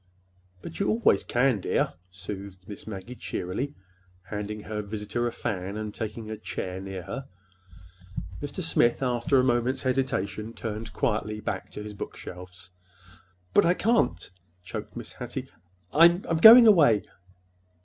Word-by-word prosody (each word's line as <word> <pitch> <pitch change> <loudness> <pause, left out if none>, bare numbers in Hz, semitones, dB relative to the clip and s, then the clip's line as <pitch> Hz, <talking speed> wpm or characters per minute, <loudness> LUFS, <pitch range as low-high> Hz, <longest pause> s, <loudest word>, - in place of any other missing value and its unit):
"But 165 - -8
you 200 - +1
always 230 +1 +3
can, 125 -2 +2
dear," - - 0 0.2
soothed 95 0 -8
Miss 105 0 -9
Maggie 105 +3 -7
cheerily, 125 +5 -4 0.5
handing 105 +1 -5
her 105 0 -4
visitor 105 +3 -3
a - - -2
fan 95 -1 -4
and 105 -1 -4
taking 110 0 -5
a 110 - -4
chair 95 -3 -5
near 95 -2 -6
her. 130 +9 -6 1.1
Mr. 145 +6 -4
Smith, 125 -6 +2
after 125 +3 +2
a 130 - +5
moment's 125 +1 +1
hesitation, 115 -5 -1
turned 110 -1 -5
quietly 105 +3 -1
back - - -4
to 105 - -6
his 105 0 -7
bookshelves. 90 -1 -9 0.8
"But - - +6
I 175 +2 +3
can't," 200 - +1 0.3
choked 90 - -7
Mrs. - - -8
Hattie. - - -6 0.4
"I—I'm 170 +1 +5
going 230 +6 +11
away." 150 - +6
110 Hz, 140 wpm, -27 LUFS, 100-135 Hz, 1.1 s, going